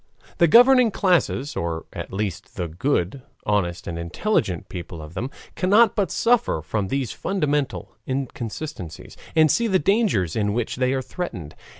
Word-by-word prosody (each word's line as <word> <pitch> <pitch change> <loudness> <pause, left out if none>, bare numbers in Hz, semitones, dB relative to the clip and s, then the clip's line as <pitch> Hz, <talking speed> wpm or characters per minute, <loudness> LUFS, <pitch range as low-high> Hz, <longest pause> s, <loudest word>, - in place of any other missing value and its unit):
The 170 - +6
governing 245 +5 +7
classes, 175 -8 +1
or 85 -1 -3
at - - -6
least 95 -2 -4
the 90 - -2
good, 95 - -1 0.2
honest, 90 -4 0
and 85 -1 -4
intelligent 90 - -1
people 85 -2 -7
of 75 +1 -9
them, 115 +8 -3 0.3
cannot 210 +5 +4
but 200 -5 +1
suffer 235 - +2
from 100 +5 -2
these 135 +1 -1
fundamental 150 -7 -2
inconsistencies, 130 - -5 0.2
and 155 -1 +5
see 235 - +2
the 190 -3 +3
dangers 185 - +1
with 105 -2 +1
which 110 +3 -1
they 130 0 +1
are 130 -1 -1
threatened. 95 - -6
130 Hz, 155 wpm, -23 LUFS, -, 0.3 s, governing